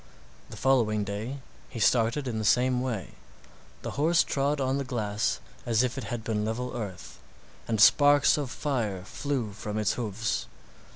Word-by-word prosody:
The - - -9
following 115 -6 +2
day 110 +7 -5 0.3
he 120 - -7
started 115 +5 +2
in 115 -3 -2
the - - -2
same 125 +3 +3
way; 120 -7 -3 0.7
the - - -4
horse 170 +2 +4
trod 140 +1 0
on 135 +1 0
the - - -1
glass 110 -5 -1 0.2
as 115 0 +2
if 125 0 -1
it 135 -5 -5
had 115 +2 -4
been 110 -2 -1
level 120 +4 -3
earth, 100 -6 -7 0.5
and 110 -2 0
sparks 145 +6 +6
of 145 -4 -3
fire 115 -10 -2
flew 130 +1 -3
from 105 +1 -5
its 105 0 +1
hoofs. 105 - -2
120 Hz, 165 wpm, -28 LUFS, 105-135 Hz, 0.7 s, sparks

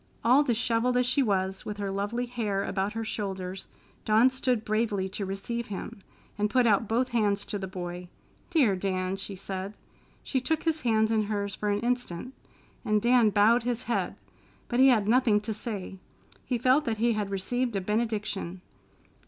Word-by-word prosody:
All 250 +5 +6
dishevelled 245 -1 +1
as 250 - +3
she 255 +3 +3
was, 190 -5 0
with 210 - -5
her 200 -1 -3
lovely 205 +5 -2
hair 215 -5 -2
about 195 +1 -2
her 225 0 -3
shoulders, 190 -3 -4 0.4
Dawn 220 +4 +4
stood 255 -3 0
bravely 215 -3 0
to 195 0 -4
receive 235 +5 -4
him, 200 0 -7 0.4
and 210 0 +1
put 250 +3 +3
out 220 0 +3
both 245 +4 +1
hands 205 -3 +1
to 205 - -4
the 190 - -4
boy. 180 -1 -6 0.4
"Dear 275 - +3
Dan!" 185 0 -1
she 195 0 -5
said. 190 +1 -5 0.5
She 260 - -1
took 320 +4 0
his 320 -1 0
hands 220 -2 +2
in 220 -1 +3
hers 200 -1 -2
for 210 - -2
an 205 0 0
instant, 245 -2 -2 0.5
and 215 0 +2
Dan 240 0 +4
bowed 215 +4 +4
his 245 +1 -2
head, 240 - -1 0.5
but 240 - 0
he 265 - +8
had 220 -6 +4
nothing 230 -2 +4
to 220 +1 -3
say. 200 -3 -6 0.5
He 250 - 0
felt 255 +5 +3
that 225 -3 -1
he 235 +2 +2
had 210 -2 -2
received 235 +5 -1
a - - +1
benediction. 210 -3 -2
215 Hz, 180 wpm, -28 LUFS, 195-240 Hz, 0.5 s, he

